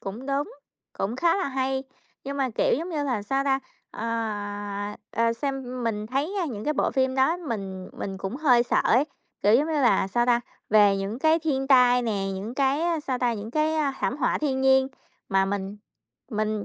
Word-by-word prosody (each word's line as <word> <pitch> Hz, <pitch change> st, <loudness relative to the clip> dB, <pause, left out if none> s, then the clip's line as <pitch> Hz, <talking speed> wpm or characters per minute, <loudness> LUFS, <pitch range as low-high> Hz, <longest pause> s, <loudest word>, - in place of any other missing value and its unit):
Cũng 215 Hz, +7 st, -7 dB
đúng, 280 Hz, +1 st, -1 dB, 0.4 s
cũng 210 Hz, +5 st, -3 dB
khá 340 Hz, +6 st, +3 dB
là 375 Hz, -, -1 dB
hay. 265 Hz, 0 st, -1 dB, 0.4 s
Nhưng 280 Hz, +1 st, -4 dB
mà, 265 Hz, -2 st, 0 dB
kiểu -, -, +3 dB
giống 335 Hz, -, -4 dB
như 295 Hz, -3 st, -1 dB
là, 250 Hz, -7 st, -1 dB
sao 270 Hz, +6 st, -1 dB
ta, 270 Hz, -1 st, +2 dB, 0.3 s
ờ, 230 Hz, -, -5 dB, 1.1 s
ờ, 230 Hz, -, +1 dB
ờ, 230 Hz, -, +3 dB
xem 255 Hz, -1 st, -4 dB
mình 215 Hz, -2 st, -2 dB
thấy, 280 Hz, -, -2 dB
a, -, -, 0 dB
những 215 Hz, -6 st, -5 dB
cái 300 Hz, -, +1 dB
bộ -, -, +1 dB
phim 260 Hz, -1 st, +1 dB
đó, 270 Hz, +6 st, +3 dB
mình 195 Hz, -, -5 dB
mình 195 Hz, -1 st, -5 dB
cũng 195 Hz, +6 st, -4 dB
hơi 255 Hz, -6 st, +4 dB
sợ 240 Hz, -, +1 dB
ấy. 255 Hz, +5 st, +4 dB, 0.4 s
Kiểu 205 Hz, +2 st, +5 dB
giống 285 Hz, +6 st, +4 dB
như 320 Hz, -, -2 dB
là, 240 Hz, -10 st, +3 dB
sao 240 Hz, +4 st, +1 dB
ta, 240 Hz, -1 st, +4 dB, 0.3 s
về 205 Hz, -2 st, +6 dB
những 200 Hz, +5 st, -3 dB
cái 315 Hz, +2 st, +4 dB
thiên 280 Hz, -5 st, -1 dB
tai 250 Hz, -2 st, +5 dB
nè, 205 Hz, -4 st, -1 dB
những 210 Hz, +5 st, -5 dB
cái, 295 Hz, +5 st, +1 dB
sao 260 Hz, -4 st, -2 dB
ta, 245 Hz, -1 st, +1 dB
những 215 Hz, 0 st, -6 dB
cái, 310 Hz, +3 st, +1 dB
a, 290 Hz, -3 st, +1 dB
thảm 255 Hz, -, 0 dB
họa -, -, +1 dB
thiên 270 Hz, -3 st, -1 dB
nhiên 265 Hz, 0 st, +4 dB, 0.4 s
mà 195 Hz, 0 st, +3 dB
mình 195 Hz, +1 st, -3 dB, 0.5 s
mình, 215 Hz, -1 st, -1 dB
255 Hz, 210 wpm, -26 LUFS, 215-280 Hz, 1.1 s, về